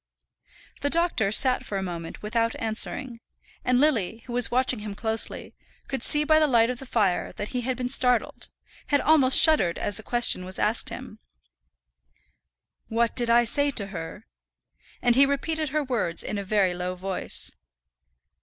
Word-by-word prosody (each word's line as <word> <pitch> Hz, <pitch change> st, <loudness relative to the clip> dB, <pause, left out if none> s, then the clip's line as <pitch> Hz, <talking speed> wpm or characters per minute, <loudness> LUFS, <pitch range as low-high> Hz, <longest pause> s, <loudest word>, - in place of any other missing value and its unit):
The 285 Hz, -, -1 dB
doctor 330 Hz, -, 0 dB
sat 255 Hz, +3 st, +3 dB
for 200 Hz, -, -5 dB
a 190 Hz, -, -3 dB
moment 170 Hz, -1 st, -7 dB
without 230 Hz, +2 st, -1 dB
answering, 230 Hz, +2 st, -2 dB, 0.4 s
and 250 Hz, 0 st, +1 dB
Lily, 230 Hz, -7 st, 0 dB
who 245 Hz, -, -8 dB
was 245 Hz, -1 st, +1 dB
watching 255 Hz, -1 st, +1 dB
him 210 Hz, -1 st, -7 dB
closely, 220 Hz, +1 st, -2 dB, 0.3 s
could 270 Hz, -, -4 dB
see 295 Hz, +4 st, +3 dB
by 310 Hz, +1 st, +4 dB
the 310 Hz, -, +3 dB
light 235 Hz, -3 st, +3 dB
of 250 Hz, -, -7 dB
the 270 Hz, -, -10 dB
fire 200 Hz, -7 st, 0 dB
that 205 Hz, -, -6 dB
he 250 Hz, -, -3 dB
had 250 Hz, +1 st, -3 dB
been 250 Hz, -1 st, -3 dB
startled 250 Hz, -2 st, +1 dB, 0.4 s
had 285 Hz, -, +2 dB
almost 275 Hz, -4 st, +5 dB
shuddered 300 Hz, -, +4 dB
as 205 Hz, -, -2 dB
the -, -, -5 dB
question 240 Hz, -5 st, +3 dB
was 185 Hz, +1 st, -3 dB
asked -, -, 0 dB
him. -, -, -10 dB, 1.7 s
"What 230 Hz, 0 st, -1 dB
did 240 Hz, -2 st, -1 dB
I 235 Hz, +1 st, +5 dB
say 285 Hz, +5 st, +2 dB
to 220 Hz, -8 st, -1 dB
her?" 165 Hz, +4 st, -8 dB, 0.8 s
and 240 Hz, -1 st, +5 dB
he 275 Hz, +2 st, +5 dB
repeated 310 Hz, +2 st, -2 dB
her 305 Hz, +2 st, -1 dB
words 235 Hz, -10 st, -2 dB
in 210 Hz, -, -4 dB
a -, -, -5 dB
very 195 Hz, -2 st, +1 dB
low 180 Hz, +1 st, -4 dB
voice. 190 Hz, +1 st, -2 dB
235 Hz, 175 wpm, -25 LUFS, 205-265 Hz, 1.7 s, almost